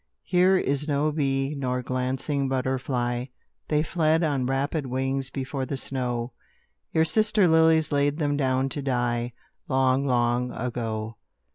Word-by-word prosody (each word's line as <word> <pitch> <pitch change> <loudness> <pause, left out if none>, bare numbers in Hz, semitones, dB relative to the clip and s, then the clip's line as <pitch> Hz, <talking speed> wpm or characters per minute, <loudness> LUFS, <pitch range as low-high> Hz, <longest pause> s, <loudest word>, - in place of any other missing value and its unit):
Here 185 +1 +4
is 145 -2 -1
no 150 +1 +1
bee 135 -1 0
nor 125 -3 -2
glancing 130 +2 -1
butterfly; 125 -2 -1 0.4
They 150 0 +2
fled 160 0 +1
on 140 -5 0
rapid 140 +2 -1
wings 130 +1 -1
before 135 +1 -4
the 140 - -3
snow: 125 -3 -3 0.6
Your 160 0 +3
sister 215 +1 +3
lilies 160 -1 +4
laid 145 0 +1
them 145 -3 0
down 130 -1 +1
to 145 - -4
die, 120 -2 -1 0.3
Long, 130 -1 +2
long 120 0 +1
ago. 115 -2 -4
135 Hz, 135 wpm, -26 LUFS, 125-150 Hz, 0.6 s, Here